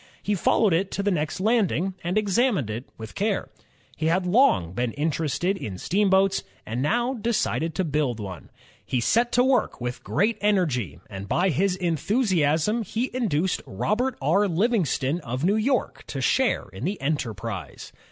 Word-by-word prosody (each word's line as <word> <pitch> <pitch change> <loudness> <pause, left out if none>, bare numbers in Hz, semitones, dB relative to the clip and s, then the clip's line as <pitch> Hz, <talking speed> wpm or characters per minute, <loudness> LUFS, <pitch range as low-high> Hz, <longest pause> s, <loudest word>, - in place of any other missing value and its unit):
He 210 - 0
followed 200 +1 +3
it 185 +4 +1
to 200 - -1
the 205 - +2
next 155 -2 -1
landing 195 -3 +1
and 175 +4 -1
examined 210 - +1
it 115 +5 -5
with 110 -1 -8
care. 205 0 -1 0.5
He 160 - -1
had 180 +3 +2
long 180 - +3
been 120 +3 -1
interested 160 +5 -1
in 100 - -6
steamboats 195 - +2 0.2
and 115 +3 -3
now 240 - +1
de 235 -1 -2
cided 165 -7 -1
to 190 - +1
build 145 -7 -1
one. 95 -4 -7 0.3
He 125 - -1
set 235 - +2
to 245 - +5
work 260 -1 +1
with 125 0 -5
great 210 +9 0
energy, 150 - +1
and 95 0 -7
by 180 - +2
his 185 +4 +1
enthusiasm 180 - +1
he 225 +4 -2
induced 190 - 0
Robert 230 - -1
R. 195 +9 +3
Livingston 175 - +1
of 130 -3 -4
New 190 +4 +3
York 235 +2 0
to 135 - -4
share 255 - +1
in 95 - -8
the 190 +6 -2
enterprise. 115 - -4
180 Hz, 165 wpm, -25 LUFS, 135-210 Hz, 0.5 s, to